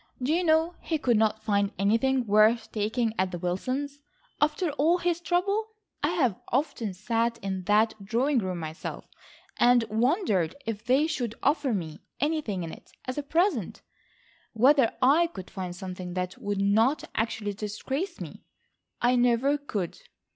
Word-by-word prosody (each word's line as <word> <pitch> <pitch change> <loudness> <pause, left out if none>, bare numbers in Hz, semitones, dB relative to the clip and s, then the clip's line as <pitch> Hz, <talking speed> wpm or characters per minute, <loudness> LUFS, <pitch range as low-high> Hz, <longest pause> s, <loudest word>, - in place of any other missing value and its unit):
Do 260 +4 0
you 350 +2 +2
know 320 +1 +3
he 320 - -1
could 245 -6 +2
not 220 0 +1
find 200 -2 +1
anything 240 +6 +2
worth 220 +2 +4
taking 220 +2 0
at 185 0 +2
the 180 - -5
Wilsons',—after 285 - -3
all 305 +5 +2
his 345 -1 -1
trouble. 400 +5 0 0.3
I 290 - +2
have 270 - +1
often 245 -7 -1
sat 230 +4 0
in 190 -2 -3
that 215 +2 +3
drawing 245 +7 +1
room 185 -4 -3
myself, 160 -1 -6 0.5
and 245 -1 +5
wondered 220 - +1
if 220 -2 -4
they 265 +5 +3
should 250 -8 -2
offer 285 -2 +2
me 165 -7 -3 0.2
anything 290 - -1
in 165 - -5
it - - -13 0.2
as 255 +3 -3
a - - -1
present, 305 - 0 0.7
whether 255 +2 +5
I 305 +7 +5
could 190 - -10
find 180 -2 -5
something 185 -1 -6
that 180 0 -2
would 205 -1 -2
not 225 +9 +3
actually 220 -2 -2
disgrace 265 - -4
me. - - -9 0.6
I 245 +1 +4
never 245 +3 +3
could. 205 - -4
235 Hz, 155 wpm, -27 LUFS, 205-290 Hz, 0.7 s, and